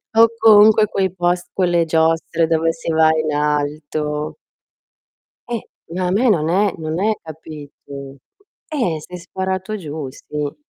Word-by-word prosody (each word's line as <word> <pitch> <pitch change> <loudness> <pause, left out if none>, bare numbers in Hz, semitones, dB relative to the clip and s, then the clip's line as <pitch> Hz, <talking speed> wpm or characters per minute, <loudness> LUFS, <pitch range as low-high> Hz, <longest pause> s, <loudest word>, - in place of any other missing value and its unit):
O 225 +1 +8
comunque 215 -1 +7
quei 190 -2 -1
pos 175 -1 0
quelle 175 -3 +2
giostre 165 +1 +1
dove 165 0 +2
si 165 0 -4
va 160 0 +4
in 155 -1 -1
alto. 150 0 -2 1.2
Eh, 225 - -4 0.3
ma 185 +1 -2
a - - 0
me 230 +6 +3
non 160 -6 +2
è 195 +3 +2
non 160 +1 -3
è 220 +2 +2
capito? 145 -3 -10 0.5
Eh, 235 - -1
sei 180 +4 -9
sparato 190 +3 -4
giù, 155 -6 -6
sì. 145 +1 -5
165 Hz, 140 wpm, -19 LUFS, 150-190 Hz, 1.2 s, O